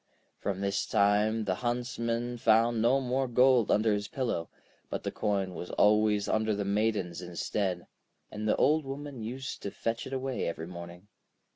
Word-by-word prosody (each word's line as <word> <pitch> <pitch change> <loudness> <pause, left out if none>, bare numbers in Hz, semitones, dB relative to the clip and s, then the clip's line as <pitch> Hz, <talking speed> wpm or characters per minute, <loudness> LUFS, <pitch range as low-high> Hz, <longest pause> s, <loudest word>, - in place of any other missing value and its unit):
From 100 -1 -3
this 100 0 -1
time 105 +2 +3
the 95 -3 0
Huntsman 120 0 -2
found 115 +1 +3
no 125 +4 +4
more 130 0 0
gold 125 -1 +4
under 110 0 +3
his 105 0 -2
pillow; 115 -9 -2 0.4
but - - -4
the - - -2
coin 100 -3 -1
was 90 - -6
always 105 -1 +3
under 110 -1 +1
the 100 0 -2
Maiden's 100 -4 0
instead, 90 +1 -2 0.5
and 105 0 -4
the - - +3
Old 155 +2 +3
Woman 135 -2 -6
used 130 +5 -5
to 100 - -3
fetch 115 +3 -3
it - - -9
away 130 -1 -2
every 80 -1 -4
morning. 85 +2 -9
110 Hz, 165 wpm, -30 LUFS, 100-120 Hz, 0.5 s, no